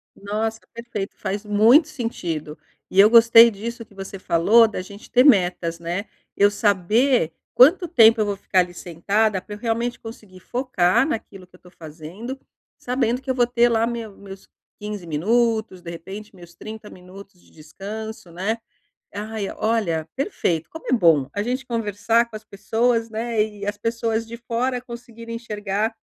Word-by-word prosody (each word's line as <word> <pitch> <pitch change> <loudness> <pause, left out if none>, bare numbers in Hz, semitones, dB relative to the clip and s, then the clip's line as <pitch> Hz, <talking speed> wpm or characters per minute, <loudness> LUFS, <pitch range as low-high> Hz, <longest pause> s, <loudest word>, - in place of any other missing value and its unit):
Nossa, 220 +2 -3
perfeito, 235 -4 -6
faz 200 +1 -4
muito 225 +10 +5
sentido. 170 - -5 0.3
E 190 - 0
eu 210 +2 +8
gostei 230 0 +8
disso 230 +3 -7
que 205 - -23
você 195 0 -8
falou, 195 +6 +4
da 210 -4 -5
gente 200 +3 -13
ter 250 +1 +5
metas, 180 - +3
né. 175 +5 -4 0.3
Eu 205 0 +5
saber 205 - +2 0.2
quanto 335 +8 +6
tempo 225 -7 +5
eu - - +2
vou 205 -1 -2
ficar 190 -1 +1
ali 175 0 0
sentada, 195 +4 -1
pra 210 +2 -9
eu - - -13
realmente 235 +1 -2
conseguir 215 -5 -12
focar 240 - +1
naquilo 200 -8 -5
que 180 - -22
eu - - -16
estou 180 0 -19
fazendo, 170 - -9 0.4
sabendo 250 0 -1
que 265 - -10
eu 260 - +1
vou 240 -1 +3
ter 240 -1 +3
lá 225 0 +2
meu 230 -4 -5
meus 195 -1 -12 0.3
15 205 -4 -6
minutos, 220 +4 0
de 170 - -9
repente, 195 +5 -9
meus 175 -1 -14
30 215 0 -9
minutos 185 +1 -14
de - - -25
descanso, 195 +5 -9
né. 200 +7 -2 0.6
Ai, 210 0 -4
olha, 195 -8 0
perfeito. 175 - -2
Como 320 - -11
é - - -2
bom 165 - +4
a 205 - -2
gente 250 +4 -3
conversar 230 0 0
com 220 - -11
as 215 - -8
pessoas, 230 +3 0
né, 225 0 -1
e 210 -2 -7
as 205 0 -3
pessoas 230 +1 -2
de 235 - -7
fora 245 +2 -2
conseguirem 235 -1 -9
enxergar 210 -1 -3
215 Hz, 170 wpm, -22 LUFS, 190-235 Hz, 0.6 s, eu